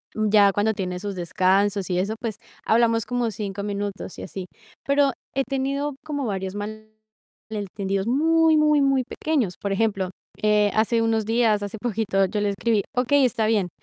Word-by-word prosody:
Ya 210 Hz, -2 st, +4 dB
cuando 215 Hz, +2 st, +1 dB
tiene 180 Hz, -3 st, -4 dB
sus 200 Hz, -1 st, -5 dB
descansos 190 Hz, +3 st, +1 dB
y 180 Hz, -, 0 dB
eso, 200 Hz, +4 st, -1 dB
pues 225 Hz, -4 st, -3 dB, 0.3 s
hablamos 230 Hz, -1 st, +3 dB
como 245 Hz, -2 st, -1 dB
5 200 Hz, -1 st, -5 dB
minutos 200 Hz, -2 st, -4 dB
y -, -, -6 dB
así. 185 Hz, -1 st, -6 dB, 0.4 s
Pero 280 Hz, 0 st, +3 dB, 0.2 s
he 270 Hz, 0 st, +1 dB
tenido 275 Hz, +1 st, -2 dB
como 285 Hz, -3 st, -3 dB
varios 190 Hz, -1 st, -3 dB, 1.0 s
malentendidos 195 Hz, -2 st, -3 dB
muy, 320 Hz, +4 st, +4 dB
muy, 300 Hz, -1 st, +4 dB
muy 270 Hz, -2 st, +3 dB
pequeños. 260 Hz, -, -1 dB
Por 200 Hz, -, -2 dB
ejemplo, 195 Hz, -3 st, 0 dB, 0.3 s
eh, 210 Hz, -1 st, +3 dB
hace 225 Hz, +1 st, +2 dB
unos 225 Hz, -1 st, +1 dB
días, 225 Hz, -2 st, +2 dB
hace 205 Hz, +2 st, -5 dB
poquito, 215 Hz, -4 st, +1 dB
yo 205 Hz, +2 st, -2 dB
le 205 Hz, -, +1 dB
escribí: 210 Hz, +1 st, 0 dB
"Okey, 265 Hz, +2 st, +3 dB
está 225 Hz, -3 st, 0 dB
bien". 205 Hz, -5 st, +1 dB
215 Hz, 165 wpm, -24 LUFS, 200-245 Hz, 1.0 s, Ya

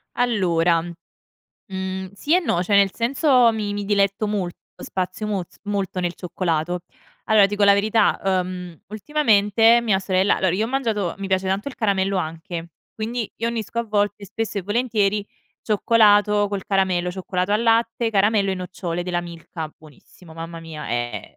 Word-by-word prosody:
Allora, 175 Hz, -8 st, +2 dB, 0.7 s
mhmm, 190 Hz, -2 st, -6 dB
sì 290 Hz, -, 0 dB
e 365 Hz, -, +4 dB
no, 180 Hz, -, 0 dB
cioè 200 Hz, +2 st, +1 dB
nel 200 Hz, -1 st, +5 dB
senso 250 Hz, -1 st, +3 dB
mi 210 Hz, -2 st, -3 dB
mi 205 Hz, 0 st, -3 dB
diletto 200 Hz, +1 st, +1 dB
molto, 195 Hz, -4 st, -2 dB, 0.3 s
spazio 185 Hz, +3 st, -3 dB
mol 195 Hz, -4 st, -1 dB, 0.2 s
molto 200 Hz, -3 st, -2 dB
nel 175 Hz, -1 st, -2 dB
cioccolato. 175 Hz, -1 st, -2 dB, 0.5 s
Allora, 210 Hz, -2 st, +6 dB
dico 205 Hz, 0 st, -2 dB
la 200 Hz, 0 st, +7 dB
verità: 215 Hz, +1 st, +2 dB
ehm, 180 Hz, -3 st, -2 dB
ultimamente 225 Hz, -2 st, +3 dB
mia 215 Hz, -5 st, +2 dB
sorella 190 Hz, 0 st, +2 dB
allora 185 Hz, -2 st, +1 dB
io 210 Hz, +4 st, 0 dB
ho -, -, -6 dB
mangiato 225 Hz, -9 st, -1 dB
mi 195 Hz, 0 st, -5 dB
piace 190 Hz, 0 st, +1 dB
tanto 195 Hz, +8 st, -1 dB
il 270 Hz, -, -11 dB
caramello 195 Hz, -2 st, +1 dB
anche, 165 Hz, 0 st, -5 dB, 0.2 s
quindi 225 Hz, 0 st, -4 dB
io 230 Hz, -, -1 dB
unisco 235 Hz, -1 st, -4 dB
a 235 Hz, -, 0 dB
volte, 205 Hz, -1 st, -1 dB
spesso 215 Hz, +1 st, -3 dB
e -, -, -4 dB
volentieri, 210 Hz, -1 st, 0 dB, 0.4 s
cioccolato 210 Hz, -1 st, +4 dB
col 200 Hz, -1 st, -4 dB
caramello, 185 Hz, -3 st, +1 dB
cioccolato 185 Hz, +1 st, -2 dB
al 215 Hz, +2 st, +2 dB
latte, 230 Hz, 0 st, +2 dB
caramello 205 Hz, -1 st, +2 dB
e -, -, 0 dB
nocciole 180 Hz, -2 st, -4 dB
della 175 Hz, -1 st, -1 dB
Milka. 165 Hz, -2 st, -8 dB
Buonissimo, 160 Hz, +2 st, -17 dB
mamma 165 Hz, 0 st, -7 dB
mia, 160 Hz, -2 st, -8 dB
è 120 Hz, 0 st, -4 dB
200 Hz, 165 wpm, -22 LUFS, 180-215 Hz, 0.7 s, la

